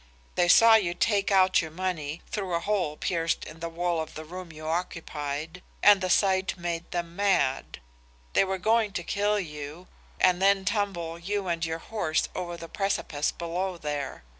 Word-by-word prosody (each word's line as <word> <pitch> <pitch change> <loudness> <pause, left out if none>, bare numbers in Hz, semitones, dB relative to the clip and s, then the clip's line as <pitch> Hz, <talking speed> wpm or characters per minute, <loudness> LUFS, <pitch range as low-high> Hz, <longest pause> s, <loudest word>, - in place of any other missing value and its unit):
They 175 - +2
saw 225 +5 +8
you 185 -6 +3
take 200 +1 +1
out 190 -1 +5
your 160 - -5
money, 160 -3 -4
through 190 -4 -3
a - - +1
hole 175 -5 -1
pierced 165 -2 -1
in 155 +1 -10
the 170 0 -4
wall 170 0 -1
of 160 - -7
the 155 - -7
room 180 +1 -8
you 155 0 -10
occupied, 160 -1 -3 0.2
and 205 -2 +7
the 185 - -1
sight 190 0 +2
made 170 -1 -4
them 170 -1 -4
mad. 185 - +1 0.5
They - - +5
were 190 0 -1
going 220 +1 +2
to 175 - -3
kill 205 +3 +1
you 150 0 -7 0.3
and 180 0 +4
then 195 0 +4
tumble 190 -5 -1
you 195 +2 -2
and 170 -1 -1
your 160 0 -1
horse 165 -4 -1
over 175 -2 -4
the 165 - -8
precipice 165 -6 -1
below 175 +2 -3
there. 145 - -4
175 Hz, 180 wpm, -27 LUFS, 165-195 Hz, 0.5 s, saw